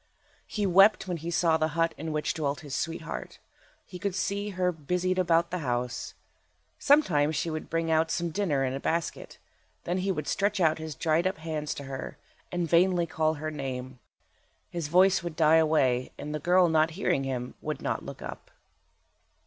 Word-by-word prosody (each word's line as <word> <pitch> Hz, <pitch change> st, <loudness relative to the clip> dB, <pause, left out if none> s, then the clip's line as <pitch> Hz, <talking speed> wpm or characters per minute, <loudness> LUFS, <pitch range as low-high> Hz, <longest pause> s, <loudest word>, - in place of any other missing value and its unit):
He 210 Hz, -2 st, -2 dB
wept 195 Hz, +2 st, +5 dB
when 180 Hz, -2 st, -2 dB
he 165 Hz, +2 st, -5 dB
saw 165 Hz, -1 st, +3 dB
the 155 Hz, 0 st, -1 dB
hut 165 Hz, 0 st, +2 dB
in 160 Hz, +1 st, -5 dB
which 150 Hz, 0 st, -1 dB
dwelt 145 Hz, -3 st, -2 dB
his 145 Hz, -3 st, -6 dB
sweetheart. 165 Hz, 0 st, -4 dB, 0.5 s
He 180 Hz, -, -9 dB
could 200 Hz, -2 st, -2 dB
see 200 Hz, +2 st, -1 dB
her 185 Hz, -2 st, 0 dB
busied 180 Hz, +4 st, -1 dB
about 170 Hz, -1 st, +2 dB
the 180 Hz, -, -2 dB
house. 125 Hz, -4 st, -3 dB, 0.6 s
Sometimes 165 Hz, -, +3 dB
she 165 Hz, -, -1 dB
would 155 Hz, 0 st, -5 dB
bring 165 Hz, 0 st, 0 dB
out 160 Hz, +1 st, +3 dB
some 170 Hz, 0 st, -1 dB
dinner 155 Hz, -7 st, 0 dB
in 130 Hz, -, -2 dB
a 135 Hz, -, -3 dB
basket. 165 Hz, +3 st, -3 dB, 0.5 s
Then 180 Hz, +2 st, -1 dB
he 195 Hz, +1 st, 0 dB
would 150 Hz, -5 st, -3 dB
stretch 200 Hz, 0 st, 0 dB
out 160 Hz, -2 st, +3 dB
his 160 Hz, -2 st, -6 dB
dried 165 Hz, +4 st, +1 dB
up 190 Hz, -, -2 dB
hands 155 Hz, -2 st, -4 dB
to 140 Hz, -, -7 dB
her, 135 Hz, -1 st, -6 dB, 0.3 s
and 175 Hz, -1 st, -1 dB
vainly 175 Hz, +1 st, +3 dB
call 155 Hz, -1 st, 0 dB
her 155 Hz, +1 st, -4 dB
name. 130 Hz, -3 st, -5 dB, 0.7 s
His 170 Hz, -4 st, -3 dB
voice 185 Hz, +3 st, +4 dB
would 170 Hz, -2 st, -5 dB
die 160 Hz, -1 st, +5 dB
away, 140 Hz, -6 st, +2 dB
and 150 Hz, -, -6 dB
the 150 Hz, -, -2 dB
girl 180 Hz, +3 st, +4 dB
not 160 Hz, -1 st, +3 dB
hearing 140 Hz, -8 st, +1 dB
him 125 Hz, -2 st, -3 dB
would -, -, -4 dB
not -, -, -2 dB
look -, -, -8 dB
up. -, -, -8 dB
165 Hz, 190 wpm, -28 LUFS, 150-180 Hz, 0.7 s, wept